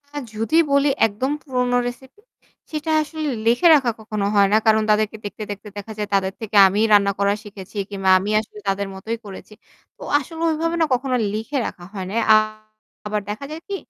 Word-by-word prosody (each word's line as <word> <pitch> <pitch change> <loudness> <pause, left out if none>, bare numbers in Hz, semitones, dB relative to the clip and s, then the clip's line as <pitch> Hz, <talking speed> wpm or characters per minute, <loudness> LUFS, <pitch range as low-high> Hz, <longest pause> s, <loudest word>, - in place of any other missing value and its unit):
হ্যা 290 0 -5
যদি 225 +9 0
বলি 280 +1 +4 0.2
একদম 225 +6 -3
পুরনো 250 -2 0
রেসিপি 265 +7 -9 0.5
সেটা 310 +1 -3
আসলে 310 0 -4 0.2
লিখে 240 +9 +4
রাখা 265 -5 +2
কখনো 215 -2 -3
হয় 200 -1 +5
না। - - +6
কারণ 220 0 +4
তাদেরকে 215 +1 +2
দেখতে, 205 +1 -6
দেখতে 205 +1 -8
দেখা 205 +2 -7
যায় 210 -1 -3
তাদের 190 -1 0
থেকে 220 -1 -6
আমি 195 +2 -1
রান্না 200 -1 +5
করা 200 0 +2
শিখেছি 200 -1 -11
কিংবা 195 -2 -1
আমি 200 +3 -3
আসলে 215 -1 -9
তাদের 195 +1 -1
মতই 225 +4 -4
করেছি। 200 +1 -10 0.4
তো - - -22 0.2
আসলে 325 +3 -9
ওইভাবে 330 +1 -1
না - - +5
কখনো 255 +1 0 0.2
লিখে 225 +7 -3
রাখা 175 - -9
হয় 190 -3 -5
না। 205 - -5 0.2
আ - - +8 0.7
আবার 210 0 -1
দেখা 215 +7 -5
যায় 315 +1 -7
কি 400 - -3
220 Hz, 195 wpm, -21 LUFS, 205-275 Hz, 0.7 s, আ